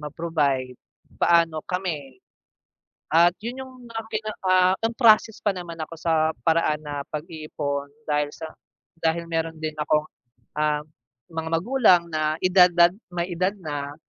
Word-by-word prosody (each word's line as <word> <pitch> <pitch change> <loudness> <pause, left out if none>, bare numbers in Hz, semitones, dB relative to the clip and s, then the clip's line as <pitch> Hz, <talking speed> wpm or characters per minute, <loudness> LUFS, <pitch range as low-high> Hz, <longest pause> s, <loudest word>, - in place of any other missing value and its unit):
ma-provide, 150 -4 -1 0.5
paano 165 -2 +3
kami? 155 -8 -4 0.9
At 170 +2 +5
yun 250 +3 -5
yung 260 - -14 0.2
mga 225 0 -4
pinaka 215 -3 -2 0.3
on 230 - 0
process 220 -3 +4
pa 205 - +3
naman 175 -2 -7
ako 155 - -6
sa 160 -1 +2
paraan 160 -2 +2
na 145 -1 -4
pag-iipon 150 -3 -4 0.2
dahil 150 -1 +1
sa 160 - -8 0.6
dahil 170 +1 0
meron 165 -1 -2
din 155 -1 -4
akong, 150 0 0 0.5
ah, 150 0 +1 0.5
mga 160 0 -3
magulang 180 +1 +4
na 155 0 0
edad 180 0 +6
dad 175 +1 +5 0.2
may 175 0 -3
edad 185 +3 0
na. 145 -5 -5
165 Hz, 135 wpm, -24 LUFS, 150-180 Hz, 0.9 s, edad